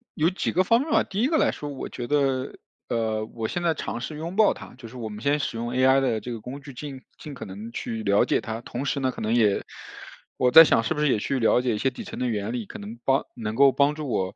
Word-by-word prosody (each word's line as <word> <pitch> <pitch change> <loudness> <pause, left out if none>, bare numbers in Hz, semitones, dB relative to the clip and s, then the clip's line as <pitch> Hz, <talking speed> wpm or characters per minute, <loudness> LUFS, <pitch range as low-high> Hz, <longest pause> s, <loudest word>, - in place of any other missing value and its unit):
有 160 +2 +3
几 185 - -2
个 185 - +3
方 230 +6 +3
面 310 - -4
吧。 - - +4
第 195 +3 -3
一 255 - +3
个 315 0 +2
来 - - +3
说 145 - -6
我 140 -2 -6
觉 120 - -6
得， 135 -2 0 0.3
呃， 110 -2 -1
我 110 0 -5
现 175 - -3
在 170 -2 +2
尝 120 - -5
试 150 +3 -5
拥 170 +4 -5
抱 215 0 +5
它， - - -12
就 125 -2 -11
是 125 - -13
我 115 -3 -5
们 105 +1 -8
先 145 +2 +2
使 130 - -3
用 120 +1 -3
AI 130 +1 +4
的 120 -5 +1
这 120 - -7
个 115 - -6
工 135 +5 -8
具 140 -1 -11
尽 135 0 -8 0.2
尽 150 - -9
可 - - -8
能 105 +4 -8
去 115 -1 -4
了 100 0 +3
解 - - +1
它， 110 +1 -5
同 125 +3 -5
时 140 - -1
呢， 130 -1 0
可 - - -9
能 110 +2 0
也 105 -4 +3 0.7
我 125 -1 +3
在 165 +3 +11
想 115 -7 +3
是 115 - 0
不 - - -4
是 150 -2 +2
也 - - +1
去 135 +5 -1
了 120 +2 +3
解 125 -3 0
一 - - -3
些 135 - +1
底 125 - -8
层 - - -8
的 125 - 0
原 105 -1 -2
理， 120 -4 -3
可 - - -10
能 110 +3 -9
帮 135 0 +3
能 110 -3 -4
够 140 +1 +6
帮 140 +2 +3
助 150 -1 -6
我， 95 -4 -1
130 Hz, 320 characters per minute, -25 LUFS, 115-145 Hz, 0.7 s, 在